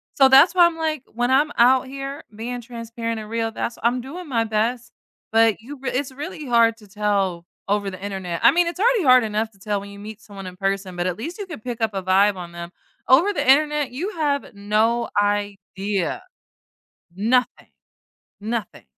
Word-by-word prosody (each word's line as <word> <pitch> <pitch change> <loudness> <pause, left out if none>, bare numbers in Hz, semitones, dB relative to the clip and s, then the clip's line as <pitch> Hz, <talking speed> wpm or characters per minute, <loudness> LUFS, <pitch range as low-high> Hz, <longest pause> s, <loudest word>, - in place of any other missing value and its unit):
So 270 - +6
that's 275 +7 +7
why 350 -1 +7
I'm, 340 -1 0
like 310 -4 -2
when 240 +2 0
I'm 290 +3 +3
out 255 +2 +5
here 275 +2 -6
being 240 +3 -5
transparent 230 -1 -5
and 215 -1 -9
real, 225 0 -1
that's 230 +1 -4
I'm 245 +2 +1
doing 325 +8 -8
my 235 -5 +1
best, 225 +3 -1 0.4
but 225 -1 +3
you 270 +6 -9
r 265 - -1
it's 265 +1 -2
really 290 +2 -7
hard 230 -2 +4
to 210 -2 -17
tell 195 -4 -1 0.2
over 205 0 0
the 185 0 -10
Internet. 190 -4 -4
I 235 - +9
mean, 350 +4 +3
it's 345 +2 -5
already 465 -1 +3
hard 255 -3 +6
enough 220 +1 -2
to 195 - -25
tell 205 +1 -2
when 200 0 -10
you 200 - -11
meet 215 +1 -9
someone 195 -2 -10
in 180 0 -10
person, 195 -1 -2
but 175 0 -2
at 180 -1 -2
least 330 +10 -6
you 410 - -5
can 340 -8 -8
pick 240 0 -6
up 220 -1 +1
a 195 - -2
vibe 195 +2 +3
on 175 -2 -8
them. 170 0 -8 0.4
Over 320 +11 +5
the 345 - -2
Internet, 295 0 +3
you 315 +11 -3
have 285 -5 -1
no 220 +4 +1
idea. 205 - -2 0.9
Nothing! 245 +5 0 0.7
Nothing. 220 -2 -4
230 Hz, 200 wpm, -22 LUFS, 205-265 Hz, 0.9 s, I